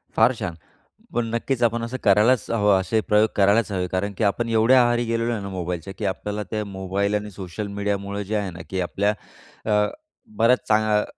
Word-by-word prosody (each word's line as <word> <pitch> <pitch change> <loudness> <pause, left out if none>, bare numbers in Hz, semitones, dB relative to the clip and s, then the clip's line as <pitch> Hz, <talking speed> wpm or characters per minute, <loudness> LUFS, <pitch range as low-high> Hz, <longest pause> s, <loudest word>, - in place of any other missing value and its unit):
फार 115 +3 +5
छान, 90 -6 -4 0.6
पण 120 0 0
नक्कीच 120 +1 -1
आपण 115 0 +1
असं 120 +3 -4
करायलाच 105 +5 +4
हवं, 105 -4 +3
असे 110 +4 0
प्रयोग 105 +1 +3
करायलाच 105 +2 +3
हवे 90 -2 -1
कारण 95 +3 -2
की - - -1
आपण 115 +3 +1
एवढ्या 115 +3 +5
आहारी 120 0 +1
गेलेलो 115 +1 0
आहे 110 - -3
ना, 100 - -6
मोबाईलच्या 90 -1 -4
की 105 - -3
आपल्याला 105 +2 -3
ते 110 -1 -1
मोबाईल 100 +1 -2
आणि 105 0 -3
सोशल 95 +2 -6
मीडियामुळं 100 0 -3
जे 105 +2 -3
आहे 105 -2 -1
ना, 85 - -11
की 95 -1 -2
आपल्या 100 +4 0 0.6
अ, 105 0 +3 0.5
बऱ्याच 125 +2 +4
चांग 105 -1 +3
105 Hz, 195 wpm, -23 LUFS, 100-115 Hz, 0.6 s, फार